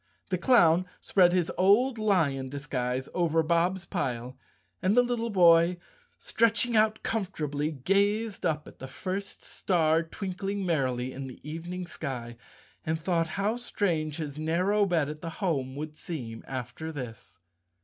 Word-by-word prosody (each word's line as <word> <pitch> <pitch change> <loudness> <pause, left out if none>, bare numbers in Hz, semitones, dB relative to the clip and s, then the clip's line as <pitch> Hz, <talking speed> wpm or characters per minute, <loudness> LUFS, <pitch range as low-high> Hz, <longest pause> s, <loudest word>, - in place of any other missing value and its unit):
The 185 - +2
clown 180 -5 +5
spread 180 -3 +4
his 180 -2 +1
old 225 +6 +4
lion 155 -11 +1
disguise 130 -2 -3
over 165 -2 +2
Bob's 175 +3 +1
pile 125 - -3 0.5
and 195 +5 +2
the 245 - +7
little 240 -1 -1
boy, 175 -3 +5 0.4
stretching 230 +1 +2
out 215 0 +3
com¬ 220 -4 -1
fortably, 150 -4 -3
gazed 205 +4 +1
up 155 -1 -1
at - - -14
the 135 - -7
first 190 +9 -5
star 165 -3 +2
twinkling 195 +3 -4
merrily 130 -6 0
in 135 0 -6
the 130 - -10
evening 175 +4 -5
sky 130 -8 -6 0.5
and 160 0 -1
thought 165 0 0
how 210 +4 0
strange 170 -10 -1
his 150 -3 -5
narrow 185 +6 +2
bed 165 -6 +1
at 150 0 -7
the 165 - -4
home 135 -9 -1
would 150 +1 -6
seem 120 -9 -6
after 130 +5 -5
this. 125 -5 -8
165 Hz, 150 wpm, -28 LUFS, 145-195 Hz, 0.5 s, the